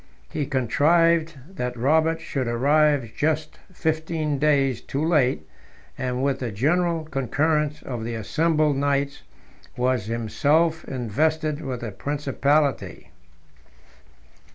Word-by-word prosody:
He 145 - -2
contrived 160 +5 +2
that 125 -10 -5
Robert 160 +6 +2
should 135 -6 -3
arrive 140 +1 +2
just 155 0 -1
fifteen 160 -3 -2
days 140 -4 +2
too 140 +3 -3
late; 130 - +1 0.5
and 125 0 -2
with 140 -1 0
the 125 -3 -3
general 165 - +1
concurrence 150 +2 0
of 120 -4 -5
the 115 +1 -4
assembled 150 +5 +1
knights 140 +1 0 0.6
was 125 -4 0
himself 140 +9 +1
invested 155 +6 -1
with 130 -5 -5
the 115 -3 -5
principality. 140 - -1
145 Hz, 105 wpm, -24 LUFS, 125-155 Hz, 0.6 s, contrived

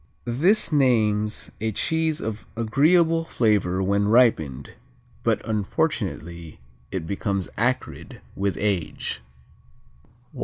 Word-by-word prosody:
This 165 - +2
names 110 -7 +1
a 110 0 0
cheese 160 +8 0
of 110 -1 -5
agreeable 160 +8 +3
flavor 105 - +1
when 100 +1 +1
ripened, 80 - +2 0.5
but, - - 0
unfortunately, 95 - -2 0.3
it 90 -4 -4
becomes 100 +1 -2
acrid 125 +3 -2 0.2
with 100 0 -1
age. 90 -11 -2
110 Hz, 90 wpm, -24 LUFS, 95-130 Hz, 0.5 s, agreeable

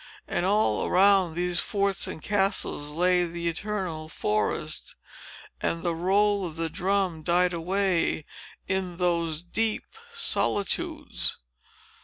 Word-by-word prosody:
And 175 - -1
all 200 - +2
around 190 -3 +4
these 175 0 0
forts 200 -2 0
and 160 - -7
castles 195 -7 +1
lay 180 +3 +2
the 170 0 -4
eternal 170 -3 -3
forest; 105 -8 -1 0.7
and 165 - -2
the 170 -2 0
roll 200 +4 +2
of 165 -4 -5
the 165 -1 -2
drum 190 -3 0
died 175 +2 +2
away 180 -2 0 0.4
in 185 -2 -2
those 170 -3 -1
deep 220 +5 -1 0.3
solitudes. 205 - +1
180 Hz, 115 wpm, -26 LUFS, 165-195 Hz, 0.7 s, around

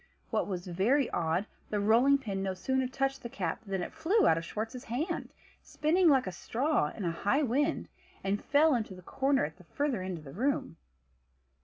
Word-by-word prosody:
What - - 0
was 180 -3 -4
very 220 +10 +2
odd, 170 +4 0 0.2
the 210 - 0
rolling 235 +7 +5
pin 200 -8 -4
no 190 -1 -2
sooner 260 +6 0
touched 270 +1 -1
the 235 - -6
cap 180 -3 -3
than 195 -4 -2
it - - -7
flew 340 +7 +3
out - - +5
of 165 - -3
Schwartz's 225 +8 -5
hand, 310 - -2 0.3
spinning 335 +3 +2
like 265 -3 +4
a 185 - -3
straw 245 - 0
in 200 - -6
a 170 - +1
high 205 - +1
wind, 285 +5 0 0.4
and 200 +1 -1
fell 300 +2 +4
into 215 -6 -2
the 180 - -13
corner 270 - +1
at 155 +3 -8
the 180 - -16
further 255 - -1
end 185 -1 -4
of 155 - -11
the 135 -2 -10
room. 265 - -1
230 Hz, 200 wpm, -31 LUFS, 185-280 Hz, 0.4 s, rolling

